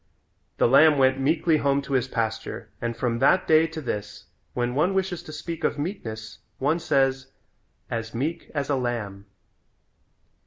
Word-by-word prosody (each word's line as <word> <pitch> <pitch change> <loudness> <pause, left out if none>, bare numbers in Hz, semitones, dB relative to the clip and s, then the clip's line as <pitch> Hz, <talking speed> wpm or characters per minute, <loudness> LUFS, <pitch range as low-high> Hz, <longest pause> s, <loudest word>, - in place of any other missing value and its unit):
The - - +4
lamb 150 +4 +6
went 130 0 +3
meekly 155 +3 +2
home 140 -1 +2
to 140 - -5
his 130 -2 +2
pasture 110 -1 -3
and 115 -1 -3
from 115 -1 -1
that 185 - +4
day 160 +1 +5
to 160 0 -7
this 105 -8 -5 0.3
when 120 0 0
one 170 +8 +1
wishes 190 -2 -1
to - - -10
speak 165 +2 -6
of - - +1
meekness 115 - -5 0.2
one 150 +5 +1
says 135 -4 +1 0.6
"as 115 -1 -4
meek 160 +8 -3
as 140 -2 -1
a 145 - +1
lamb." 110 -6 -3
135 Hz, 160 wpm, -25 LUFS, 120-155 Hz, 0.6 s, lamb